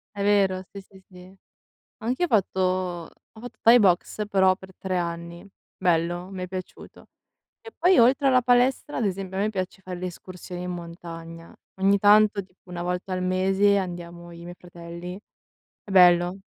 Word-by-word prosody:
È 200 - -3
vero, 195 -2 +2
sì, 200 - -9
sì, 195 0 -19
sì. 180 0 -15 0.6
Anch'io 250 +10 -1
ho - - -5
fatto 195 -3 +1 0.7
ho 220 - -14
fatto 245 +2 -10
thai 235 +2 +7
boxe, 200 +1 +1
però 190 -2 +3
per 190 0 -14
3 190 -1 -3
anni. 170 +1 -5 0.3
Bello, 175 0 0
m'è 185 -1 -5
piaciuto. 185 0 -9 0.5
E 450 - -11
poi 360 +3 +4
oltre 265 +4 +4
alla 255 -1 +4
palestra, 250 +4 +1
ad 235 - 0
esempio 190 -1 -4
a - - 0
me 210 - +1
piace 190 -2 -5
fare 180 -1 -7
le 185 - -3
escursioni 180 0 -9
in 180 - -4
montagna. 165 -1 -9 0.3
Ogni 200 +1 +4
tanto, 210 0 +4
tipo 185 0 -26
1 175 -1 -6
volta 180 +1 -3
al 185 - -2
mese 190 +2 +2
andiamo 175 -2 -6
i 170 0 -12
miei 175 +1 -9
fratelli. 175 +1 -9 0.6
È 205 - -10
bello. 180 0 +5
185 Hz, 170 wpm, -25 LUFS, 175-205 Hz, 0.7 s, thai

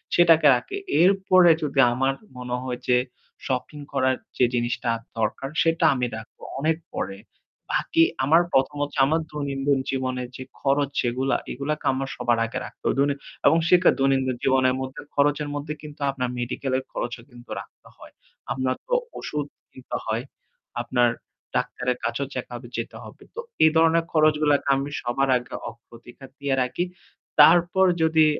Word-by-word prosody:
সেটাকে 165 -3 +6
রাখি। 255 - -4 0.2
এরপরে 185 -1 +5
যদি 140 -2 -1
আমার 135 +2 +1 0.2
মনে 125 0 -3
হয় 125 -1 -4
যে 125 - +5 0.5
শপিং 130 +3 -3
করার 130 -1 +2 0.2
যে 125 - +5
জিনিসটা 120 0 -1 0.3
দরকার, 110 +5 -1
সেটা 165 0 +2
আমি 125 - 0
রাখবো 110 - -12 0.2
অনেক 160 +2 +1 0.2
পরে। 95 0 -3 0.6
বাকি 165 - +3 0.2
আমার 160 +5 +5
১ম 135 +2 +2
হচ্ছে 145 -1 -4
আমার 160 +4 +1
দৈনন্দিন 140 -1 -1
জীবনের 130 -2 -2
যে 130 - -6 0.2
খরচ 140 0 +2
যেগুলা, 130 +3 0
এগুলাকে 145 +3 -3
আমার 135 +1 -3
সবার 120 -1 +1
আগে 125 +3 -4
রাখতে - - -13
অ - - -1 0.5
এবং 160 +3 +6
সেটা 180 0 +6
দৈনন্দিন 135 -2 +1
জীবনের 130 -1 +3
মধ্যে 130 0 -6
খরচের 145 +1 +2
মধ্যে 145 +1 -4
কিন্তু 150 -1 -10
আপনার 130 -2 -3
মেডিকেলের 130 +2 -2
খরচও 120 -1 -4
কিন্তু 120 0 -16
রাখতে - - -18
হয়। - - -14 0.4
আপনার 130 -1 -1
তো - - -3 0.3
ওষুধ 150 -1 -3 0.3
কিনতে 130 - -6
হয়। 115 +2 -1 0.6
আপনার 120 0 +2 0.5
ডাক্তারের 125 0 -1
কাছেও 140 -1 -2
চেক 130 - -4
আপ 120 - -7
এ - - -15
যেতে 115 - -5
হবে। - - -13
তো - - -6 0.3
এ - - +8
ধরনের 165 +1 +4
খরচগুলাকে 150 -2 +3
আমি 135 +1 -2
সবার 135 +3 0
আগে 125 +1 -9 0.2
অগ্রাধিকার 120 +3 -14
দিয়ে 140 -1 0
রাখি। 125 +7 -1 0.6
তারপর 175 +4 +6 0.2
যদি 160 -1 +4
135 Hz, 155 wpm, -24 LUFS, 125-150 Hz, 0.6 s, এ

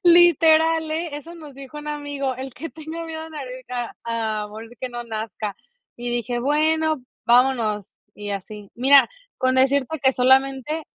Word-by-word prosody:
literal 325 -2 +5
eh, 320 -1 -2
eso 330 +4 -9
nos 305 -4 -11
dijo 275 +2 -9
un 295 - -7
amigo, 285 -3 -3
el 265 -1 -7
que 325 +4 -7
tenga 320 +1 -7
miedo 320 -1 -6
a 320 - -8
morir 255 -4 -7
a 245 -2 -3 0.5
a 210 - -8
morir 220 +2 -10
que 255 - -3
no 240 -1 -6
nazca. 220 -2 -4 0.4
Y 240 0 -4
dije: 240 0 -1
"Bueno, 310 +1 +1 0.2
vámonos", 235 -5 +2 0.2
y 205 0 -6
así, 200 +1 -6
mira, 270 +3 +6 0.3
con 255 0 +2
decirte 270 +3 +2
que 265 0 +5
solamente 265 +4 +2
270 Hz, 165 wpm, -23 LUFS, 240-315 Hz, 0.5 s, mira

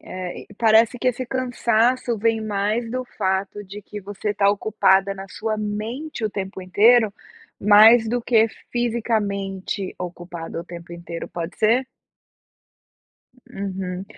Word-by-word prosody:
eh, 185 -1 -7
e - - -13
parece 225 +2 +4
que 255 - +1
esse 250 +1 -2
cansaço 245 -1 +1
vem 225 +1 +1
mais 215 +2 -1
do 255 +1 -3
fato 195 -2 -2
de 200 +2 -10
que 210 +2 -8
você 205 +2 -4
está 205 -1 +2
ocupada 195 -2 +2
na 195 0 -8
sua 215 +2 -3
mente 220 +6 -4
o 215 - 0
tempo 190 -1 -5
inteiro, 215 +4 +4 0.5
mais 220 +3 +7
do 245 +1 -1
que 225 -1 +4 0.2
fisicamente 205 -5 -2
ocupada 175 -2 -6
o - - -9
tempo 170 0 -10
inteiro, 170 -1 -7
pode 170 +1 -6
ser? 235 +4 +3 1.6
Uhum. 190 -4 -5
210 Hz, 135 wpm, -22 LUFS, 190-230 Hz, 1.6 s, mais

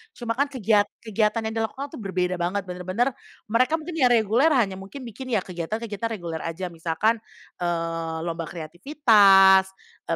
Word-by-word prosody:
cuma 235 -2 -4
kan 280 +5 +1
kegiat 215 -6 +2 0.2
kegiatan 220 +1 0
yang 220 - -3
dilakukan 265 +6 -4
tuh - - -9
berbeda 185 -3 -2
banget, 185 +4 -1
bener-bener 185 +7 -2 0.4
mereka 255 +7 +3
mungkin 325 0 -5
ya 255 - +5
reguler 235 +3 +3
hanya 195 -6 +1
mungkin 225 +8 -9
bikin 245 +3 -8
ya 190 - +1
kegiatan-kegiatan 205 +5 -4
reguler 170 -4 -5
aja, 170 +3 -5
misalkan, 170 +8 0 0.4
eee, 165 -1 -2
lomba 165 -1 -4
kreativitas, 195 - +5 0.4
eee, - - 0
200 Hz, 155 wpm, -24 LUFS, 175-230 Hz, 0.4 s, ya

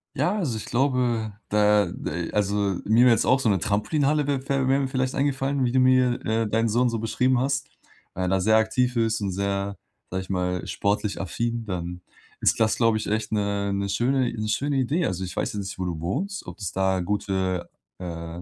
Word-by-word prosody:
Ja, 180 - +1
also 155 - -1
ich 110 - -6
glaube, 120 -5 0
da 105 0 +4
de 85 +2 -5
also 100 -2 0
mir 115 +4 +4
wär 125 - +7
jetzt - - +2
auch 130 +1 +4
so 130 - 0
'ne 100 -4 +3
Trampolinhalle 140 - +1
wär 140 -1 -1
wär 135 -1 +1
wär 135 +1 +3
mir 135 - 0
vielleicht 130 -1 -1
eingefallen, 135 0 0
wie 120 - +1
du 130 - +3
mir, 130 -1 +4
äh, 110 0 0
deinen 115 +2 +1
Sohn 120 +3 +2
so 115 -1 -2
beschrieben 125 +3 +1
hast, 135 +1 -1 0.4
weil 95 - -3
er - - 0
da 95 +1 +1
sehr 110 +3 +4
aktiv 120 +3 +1
ist 115 -1 +1
und 100 -2 -1
sehr- 100 +1 -2 0.3
sage 95 +1 -2
ich 95 - -11
mal- 90 -1 -1
sportlich 100 0 -1
affin, 115 +4 -2
dann 90 -2 -4 0.4
ist - - +2
das, 110 0 +3
glaube 115 -2 +3
ich, 110 - -4
echt 110 0 -1
'ne 100 -1 0
'ne 100 0 -1
schöne 125 +4 +1
'ne 110 -2 -3
schöne 140 +6 0
Idee. 140 +6 +1
Also 95 +1 -2
ich 90 - -5
weiß - - -2
jetzt 105 - -3
nicht, 95 -1 -7
wo 90 - -1
du 85 -3 -4
wohnst, 180 - -3
ob - - -9
es 95 -5 -4
da 95 0 +1
gute, 95 -1 -1 0.3
äh, 85 -1 -6
110 Hz, 220 wpm, -25 LUFS, 95-130 Hz, 0.4 s, wär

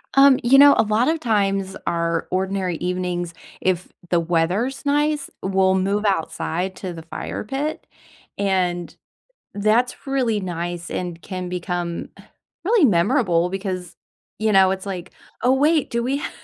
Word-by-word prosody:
Um, 275 -1 +7
you 250 +3 +6
know, 285 0 +9
a - - +5
lot 215 +3 +1
of 320 +1 +1
times 195 -5 0
our 170 -1 -1
ordinary 185 -2 -1
evenings, 180 -1 -2 0.3
if 185 -1 0 0.2
the 175 - +3
weather's 175 +10 0
nice, 295 0 +1
we'll 190 0 +2
move 200 +2 0
outside 185 -1 -1
to 185 -2 -5
the 165 -1 -9
fire 165 - -5
pit, 275 +8 -3 0.5
and 180 -3 0 0.6
that's 220 +6 +1
really 250 -6 0
nice 175 -1 -4
and 175 -2 -4
can 185 +1 -5
become, 175 -1 -3
uh, - - -13 0.4
really 425 -2 +4
memorable, 175 -2 +2
because, 185 -2 -4 0.4
you 220 0 +1
know, 190 -1 +6
it's 190 +1 -3
like, 185 -3 -5 0.3
"Oh, 250 - +4
wait, 295 +3 +2
do 235 -1 -1
we 265 +4 0
ha" - - -4
190 Hz, 150 wpm, -22 LUFS, 175-240 Hz, 0.6 s, know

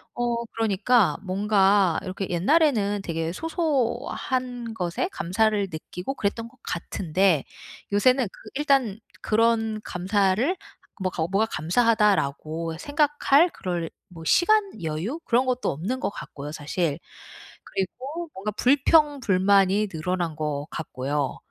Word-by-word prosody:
어 235 -1 -1
그러니까 220 -4 +2
뭔가 195 -2 +3
이렇게 190 0 -4
옛날에는 205 - +2
되게 165 0 -2
소소한 255 - -2
것에 180 - -2
감사를 205 - +1
느끼고 180 - -6
그랬던 225 +2 -2
것 - - -25
같은데 175 -1 0 0.5
요새는 255 +5 +4
그 - - -17 0.2
일단 270 -8 +2 0.2
그런 225 0 +2
감사를 200 - +1 0.4
뭐 185 - 0
가고 160 -2 -2
뭐가 200 +3 +2
'감사하다.'라고 165 - +1
생각할 290 - +3
그럴 175 -3 -3 0.2
뭐 165 -2 -11
시간, 390 - +3
여유 165 - -3
그런 245 +2 +2
것도 255 0 0
없는 195 - -3
것 - - -1
같고요, 145 -7 -8
사실. 150 0 -2 0.7
그리고 265 - -4
뭔가 200 +3 -4
불평불만이 215 - +3
늘어난 175 -1 -2
것 150 -1 -3
같고요. 140 -3 -3
205 Hz, 265 characters per minute, -25 LUFS, 175-250 Hz, 0.7 s, 요새는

